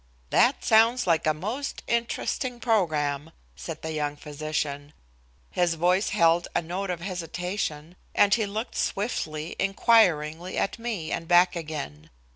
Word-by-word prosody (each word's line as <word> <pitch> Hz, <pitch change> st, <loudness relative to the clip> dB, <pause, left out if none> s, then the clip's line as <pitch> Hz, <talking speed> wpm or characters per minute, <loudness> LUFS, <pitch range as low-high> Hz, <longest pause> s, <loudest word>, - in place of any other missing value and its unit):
"That 250 Hz, +3 st, +3 dB
sounds 230 Hz, +2 st, +4 dB
like 165 Hz, -3 st, +2 dB
a -, -, +5 dB
most 220 Hz, -, -4 dB
interesting 235 Hz, +1 st, -2 dB
program," 155 Hz, -, 0 dB, 0.3 s
said 65 Hz, -, -7 dB
the 160 Hz, -, -3 dB
young 150 Hz, -1 st, -2 dB
physician. 150 Hz, -1 st, -4 dB, 0.6 s
His 175 Hz, -2 st, +1 dB
voice 180 Hz, +4 st, +2 dB
held 170 Hz, -3 st, +3 dB
a -, -, +3 dB
note 185 Hz, +4 st, -4 dB
of 175 Hz, -2 st, -3 dB
hesitation, 175 Hz, -2 st, -4 dB, 0.2 s
and 200 Hz, -1 st, +5 dB
he 220 Hz, -2 st, +2 dB
looked 215 Hz, +4 st, -4 dB
swiftly, 160 Hz, -7 st, -2 dB
inquiringly, 185 Hz, -5 st, +2 dB
at 195 Hz, -, -1 dB
me 220 Hz, -9 st, -4 dB
and 165 Hz, -, -3 dB
back 175 Hz, +1 st, +5 dB
again. 150 Hz, -, -6 dB
175 Hz, 135 wpm, -26 LUFS, 155-210 Hz, 0.6 s, a